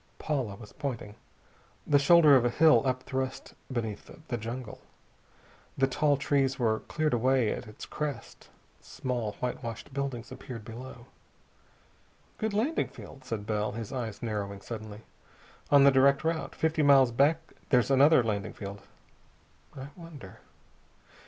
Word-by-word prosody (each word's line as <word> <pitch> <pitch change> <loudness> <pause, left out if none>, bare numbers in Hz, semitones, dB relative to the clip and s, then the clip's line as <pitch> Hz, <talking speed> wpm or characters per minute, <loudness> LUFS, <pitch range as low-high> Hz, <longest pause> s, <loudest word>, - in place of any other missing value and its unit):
Paula 130 -10 -2
was 105 -1 -13
pointing. 125 -8 -5 0.7
The 145 -1 +4
shoulder 150 0 +7
of 125 - +4
a 120 - +2
hill 150 -2 +5
upthrust 130 +1 -3 0.2
beneath 115 -5 -4 0.2
the 120 - -1
jungle. 115 +1 -6 1.0
The 135 - +4
tall 145 +2 +1
trees 135 -1 +1
were 110 -3 +1
cleared 155 -2 -2
away 125 -1 +2
at - - -7
its 105 - -10
crest. 150 -2 -6 0.3
Small, 120 -5 -4
whitewashed 125 0 -5
buildings 130 -4 -4
appeared 120 -6 -8
below. 120 +1 -9 1.3
"Good 220 0 -1
landing 260 +10 +1
field," 130 -1 -13
said 110 -4 -4
Bell, 105 -1 -1
his 115 +1 -6
eyes 120 -4 -5
narrowing 100 -3 -4
suddenly. 110 -1 -8 0.7
"On 140 -1 +7
the 140 - +7
direct 140 +2 +4
route. 160 0 -2
Fifty 160 0 0
miles 135 -4 +6
back 155 +6 +1 0.2
there's 125 -1 +3
another 140 0 +6
landing 105 -3 -2
field. 100 0 -8 1.0
I 135 +1 -7
wonder...." 160 - -12
130 Hz, 135 wpm, -29 LUFS, 115-140 Hz, 1.3 s, shoulder